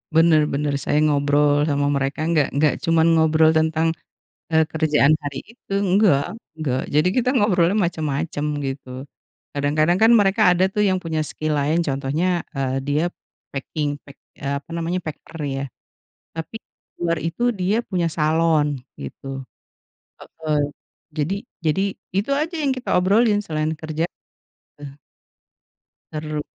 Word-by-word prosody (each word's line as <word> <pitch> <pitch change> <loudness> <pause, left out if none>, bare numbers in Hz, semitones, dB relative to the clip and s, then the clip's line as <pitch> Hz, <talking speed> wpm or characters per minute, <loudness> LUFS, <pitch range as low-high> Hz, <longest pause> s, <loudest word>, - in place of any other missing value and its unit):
Benar 160 -2 +5
benar, 145 +1 -1
saya 145 - 0
ngobrol 145 0 +2
sama 145 0 +1
mereka, 140 +2 -1
enggak 160 -4 +2
enggak 150 +1 +2
cuma 165 -1 +3
ngobrol 160 -1 +4
tentang, 160 +1 +2 0.6
eee, 160 -1 +3
kerjaan 155 -1 +3
hari 145 -2 -4 0.2
itu, 200 - -20
enggak, 195 -3 +2 0.2
enggak 130 -4 -1
jadi 150 +4 +3
kita 250 0 +2
ngobrolnya 200 -6 +3
macem-macem 155 -4 -1
gitu. 135 -1 -6 0.5
Kadang-kadang 155 +4 +2
kan 225 +5 +5
mereka 195 -1 +2
ada 180 +1 +2
tuh 210 +2 0
yang 190 -2 +2
punya 160 -1 -1
skill 155 0 -3
lain 150 +4 +1
contohnya, 150 +6 0
eee, 135 -1 -2
dia 145 +3 0 0.5
packing, 145 +1 -2
pack 140 - -16 0.2
apa 140 +1 -4
namanya 170 +2 -1
packer 165 0 -9 0.2
ya 135 - -2 0.7
tapi 165 +6 -6 0.4
diluar 170 -1 -1
itu 165 +7 -3 0.2
dia 190 +4 +1
punya 180 -3 0
salon 155 -3 +1 0.2
gitu 135 -1 -7 0.7
heeh 155 -2 -3 0.6
jadi 155 +6 0 0.3
jadi 155 +5 +2 0.4
itu 205 +8 0
aja 310 +5 -1
yang 275 - +2
kita 255 0 -6
obrolin 205 +4 +3
selain 155 -3 -2
kerja. 155 0 -3 0.8
Eh 145 - -7 1.2
Seru. 155 -1 -3
155 Hz, 135 wpm, -22 LUFS, 145-175 Hz, 1.2 s, Benar